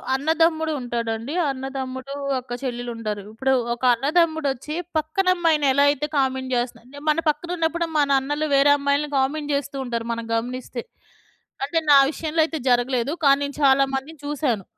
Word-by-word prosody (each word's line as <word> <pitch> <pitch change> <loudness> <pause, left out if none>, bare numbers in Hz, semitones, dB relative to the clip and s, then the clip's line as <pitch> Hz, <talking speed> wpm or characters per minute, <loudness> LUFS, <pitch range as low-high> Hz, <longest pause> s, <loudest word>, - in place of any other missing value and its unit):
అన్నదమ్ముడు 320 +2 +1
ఉంటాడండి. 235 +1 -3 0.2
అన్నదమ్ముడు 265 0 -5 0.3
ఒక 245 -1 -6
చెల్లెలు 245 -2 -3
ఉండారు. 215 -2 -4
ఇప్పుడు 265 +4 +1 0.2
ఒక 240 - -10
అన్నదమ్ముడొచ్చి 300 +1 0 0.2
పక్కన 315 +5 -1
అమ్మాయిని 320 -5 +2
ఎలా 280 +1 +4
అయితే 290 +1 -2
కామెంట్ 265 -1 0
జేస్తున్నా 245 +3 -4
మన 305 - +3
పక్కన 305 +3 -2
ఉన్నప్పుడె 335 +1 0
మన 285 - +2
అన్నలు 295 +3 -2
వేరే 280 +1 +5
అమ్మాయిల్ని 280 +1 0
కామెంట్ 290 +3 0
జేస్తూ 280 0 -2
ఉంటారు 235 -2 -3
మనం 230 0 -5
గమనిస్తే. 245 +1 -4 0.8
అంటే 325 +4 0
నా 285 - +9
విషయంలో 315 +2 -1
అయితే 320 0 -4
జరగలేదు. 245 +2 +1
కానీ 275 0 +6
నేను 280 - -7
చాలా 275 0 +5
మందిని 290 +4 -6
చూసాను. 280 -8 -1
275 Hz, 150 wpm, -23 LUFS, 250-300 Hz, 0.8 s, నా